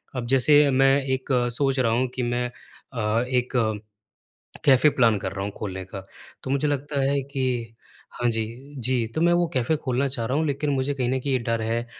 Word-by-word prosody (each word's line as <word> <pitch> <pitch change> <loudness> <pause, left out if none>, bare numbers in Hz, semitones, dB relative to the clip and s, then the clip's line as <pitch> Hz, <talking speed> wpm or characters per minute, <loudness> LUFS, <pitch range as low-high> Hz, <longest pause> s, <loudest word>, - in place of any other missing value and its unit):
अब 125 -2 -3
जैसे 145 +3 +5
मैं 135 +1 +4 0.2
एक 130 +1 -4 0.3
सोच 135 -2 +1
रहा 115 -3 +2
हूँ 125 +2 +1
कि 125 - -2
मैं 120 +1 -1
अ, 115 -2 -4
एक 125 -1 0 1.1
कैफ़े 140 +2 +6
प्लान 115 -6 +3
कर 95 - -4
रहा 95 0 -4
हूँ 100 - -4
खोलने 95 -2 -5
का। 95 0 -9 0.4
तो 130 - -4
मुझे 140 +2 +1
लगता 145 0 -2
है 140 0 +1
कि 135 0 -5 0.8
हाँ। 120 - +2
जी, 115 +5 -4
जी। 125 -1 0
तो - - -1
मैं 175 0 +4
वो 175 0 +2
कैफ़े 130 +5 +1
खोलना 135 -2 -1
चाह 120 -4 -2
रहा 130 +4 -1
हूँ 160 - 0
लेकिन 145 +1 -1
मुझे 140 +1 0
कहीं 130 -3 -1
न 130 - 0
कहीं 140 +1 -2
ये 130 - +2
डर 115 -1 -2
है 115 +2 -2
130 Hz, 210 wpm, -24 LUFS, 115-140 Hz, 1.1 s, कैफ़े